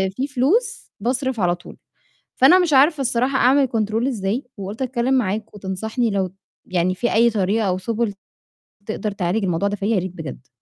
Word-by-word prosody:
في 270 +5 -1
فلوس 355 - +1
باصرف 255 0 -1
على 175 -1 +2
طول، 175 - -14 0.6
فأنا 340 +9 +6
مش 340 -5 +1
عارفة 285 +2 +5
الصراحة 255 +1 +1
أعمل 265 +2 +4
control 220 +2 0
ازاي؟ 225 0 -2
وقُلت 200 +5 -6
أتكلم 255 0 0
معاك 215 -2 -1
وتنصحني 220 +5 -2
لو 190 -2 0 0.4
يعني 185 0 0
في 240 +5 -1
أي 235 +2 +5
طريقة 210 0 0
أو 180 - 0
سُبل 220 +2 -2 0.7
تقدر 215 -1 -3
تعالج 195 +2 -1
الموضوع 180 +2 0
ده 205 - -2
فيَّ، 200 - -5
يا 200 - +3
ريت 185 0 -4
بجد؟ 135 -6 -8
220 Hz, 175 wpm, -21 LUFS, 190-255 Hz, 0.7 s, فأنا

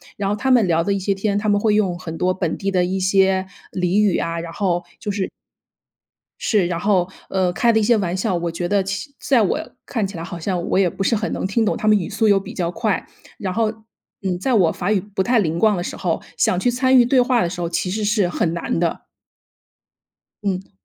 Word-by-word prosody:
然 200 -1 -2
后 205 - +1
他 265 - -1
们 245 -5 +5
聊 165 -1 +2
的 200 +4 0
一 200 - -1
些 195 +1 0
天， 200 +1 -1
他 215 +1 0
们 205 0 +3
会 210 -1 +2
用 190 -5 +1
很 165 -3 -6
多 185 +2 +1
本 180 -3 -2
地 195 0 -2
的 180 -2 +2
一 190 +1 -2
些 190 0 +3 0.3
俚 180 +2 +1
语 205 -4 +3
啊， 165 0 -2
然 165 0 -7
后， 175 -3 0
就 210 - -4
是 195 -1 -2 1.1
是， 205 -5 +2
然 170 -1 -2
后 185 -2 +2 0.2
呃， 185 -2 +1
开 235 +6 +2
的 220 - +3
一 - - +1
些 235 +3 +4
玩 180 -3 -1
笑， 190 0 -1
我 170 0 -1
觉 170 +1 -3
得 200 +2 +2
其 195 +10 -5
在 255 -5 +3
我 200 - +1 0.3
看 220 -6 -2
起 190 - -8
来 165 - -5
好 170 - -7
像 180 0 -2
我 - - +2
也 190 - +4
不 195 - -4
是 230 - +2
很 220 0 -1
能 - - -2
听 220 +4 +1
懂， - - +1
他 - - -3
们 215 0 +6
语 175 - -4
速 220 +1 0
又 200 -2 +4
比 195 - -9
较 170 -3 -1
快， 215 +2 -1 0.3
然 190 -2 -3
后， 220 +2 +1 0.5
嗯， 185 -2 -1
在 255 +5 +1
我 180 -7 +4
法 180 +4 -2
语 210 - +3
不 205 0 -3
太 240 +4 +2
灵 165 -5 0
光 215 +1 +3
的 175 - -2
时 - - -5
候， 175 -4 -1 0.2
想 180 - +2
去 245 +7 +2
参 260 +2 +3
与 245 - +7
对 255 +2 +3
话 245 -1 +2
的 170 - -1
时 180 -1 -6
候， 170 - -1
其 180 +2 -1
实 215 +3 -2
是 205 -2 +2
很 170 -1 -1
难 170 -1 -2
的。 170 -2 0 1.4
嗯。 190 -1 -2
195 Hz, 270 characters per minute, -21 LUFS, 180-215 Hz, 1.4 s, 与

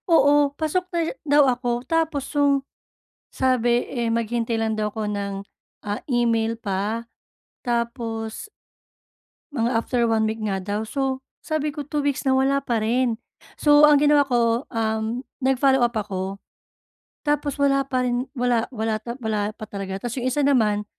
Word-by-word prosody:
Oo, 290 -3 +5
pasok 325 +4 0
na 345 - -3
siya 330 - -4
daw 290 +1 +6
ako. 245 -1 0
Tapos 320 -2 0
'yong 285 -2 +3 0.7
sabi, 245 -2 +2
eh, 235 -3 -1
maghintay 230 0 -1
lang 220 0 0
daw 210 0 0
ako 215 0 -4
ng, 200 -1 -3 0.5
ah, 205 0 -3
email 230 -2 +2
pa. 210 +2 -2 0.6
Tapos 235 - -3 1.0
mga 235 -4 0
after 240 -2 +1
1 225 -1 +2
week 220 +1 -2
nga 195 -3 -2
daw. 205 +2 -2
So, 270 +1 -1 0.2
sabi 305 -1 -2
ko, 295 - -4
2 295 +1 -3
weeks 285 -1 -1
na, 265 - +2
wala 270 +1 +2
pa 235 -4 0
rin. 230 +1 +1 0.4
So, 295 0 +6
ang 300 -1 +7
ginawa 295 0 +5
ko, 240 -2 +1
um, 225 +2 -2 0.2
nag-follow-up 265 -2 +3
ako. 195 -3 -3 0.9
Tapos 295 -1 0
wala 275 -1 +3
pa 255 -2 0
rin, 245 +1 -1
wala 240 -2 +1
wala 220 0 -1 0.2
wala 215 -4 -1
pa 215 - -8
talaga. 195 -2 -5
Tapos 235 +3 -5
'yong 250 +1 0
isa 285 +2 +1
naman, 215 -7 +2
240 Hz, 155 wpm, -23 LUFS, 220-275 Hz, 1.0 s, ang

